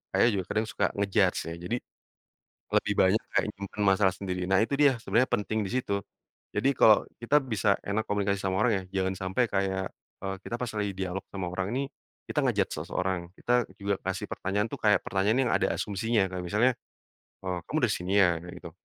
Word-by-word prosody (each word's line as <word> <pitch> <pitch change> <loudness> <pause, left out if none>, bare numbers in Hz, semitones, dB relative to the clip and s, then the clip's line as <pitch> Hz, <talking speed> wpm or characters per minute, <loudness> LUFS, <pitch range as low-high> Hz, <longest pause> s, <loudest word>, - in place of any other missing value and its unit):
ayah 120 - +5
juga 95 -3 -2
kadang 105 +1 0
suka 110 - 0
nge-judge 100 -2 +2
ya, - - -5
jadi 90 +7 -2 1.0
lebih - - +2
banyak 95 +4 +4
kayak - - +3
nyimpan 100 +1 -5
masalah 95 -1 +4
sendiri. 90 -1 -3
Nah 95 +3 +4
itu - - -8
dia 140 -4 +5
sebenarnya 120 +2 +1
penting 110 -1 0
disitu, 100 -1 -1 0.6
jadi 135 +2 +3
kalau 110 -5 +6 0.2
kita 120 +5 +3
bisa 105 -5 +2
enak 105 +2 -1
komunikasi 100 -1 0
sama 95 +2 +1
orang 125 - +4 0.2
ya 95 0 -1
jangan 95 - 0 0.2
sampai 125 +7 +2
kayak, 95 -1 -1 0.3
e - - -2
kita 120 - -4
pas 120 -1 -3
lagi 105 -2 -1
dialog 95 0 -3
sama 90 -3 -4
orang 95 +1 -2
ini 135 - +1 0.5
kita - - +2
nge-judge - - +1
seseorang, 90 -2 -2
kita 120 -1 +1
juga 100 -1 -2
kasih 95 0 -3
pertanyaan 105 +4 -2
tuh - - -5
kayak 105 -3 +3
pertanyaan 100 +5 +1
yang - - 0
ada - - +2
asumsinya 105 -1 0
kayak 90 - -3
misalnya, 115 +8 +3 0.7
"Eee 90 -1 -2
kamu - - -1
dari - - +3
sini 90 +2 -3
ya?" 85 -3 +2
kayak 85 +1 -10
gitu. 85 - -6
100 Hz, 195 wpm, -28 LUFS, 95-110 Hz, 1.0 s, kalau